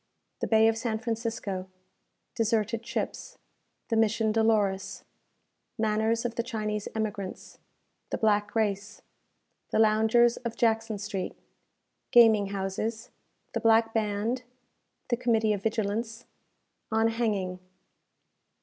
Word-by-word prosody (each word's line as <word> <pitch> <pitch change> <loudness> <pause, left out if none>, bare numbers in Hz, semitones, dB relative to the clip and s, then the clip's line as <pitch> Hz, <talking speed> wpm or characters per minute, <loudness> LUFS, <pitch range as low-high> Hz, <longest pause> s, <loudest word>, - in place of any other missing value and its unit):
The - - -2
Bay 220 0 +5
of 225 0 +1
San 225 -2 -1
Francisco 225 -5 -3 0.7
Deserted 225 0 0
Ships - - -4 0.5
The 225 - +1
Mission 220 0 +2
Dolores 215 -3 +1 0.7
Manners 220 +1 +1
of 240 - -1
the 235 - -1
Chinese 215 -3 -3
Emigrants 205 -3 -4 0.5
The - - -2
Black 205 -1 +1
Race 205 -1 -1 0.7
The - - 0
Loungers 220 +2 +4
of 235 -2 -5
Jackson 225 -2 +1
Street 200 -2 -4 0.7
Gaming 220 -4 +6
Houses 200 +3 -3 0.4
The - - 0
Black 225 0 +4
Band 220 +3 -1 0.7
The 240 - +1
Committee 225 -3 +2
of 200 - -3
Vigilance 225 +2 -2 0.7
On 220 +1 +3
Hanging. 205 -6 -1
220 Hz, 110 wpm, -28 LUFS, 210-230 Hz, 0.7 s, Gaming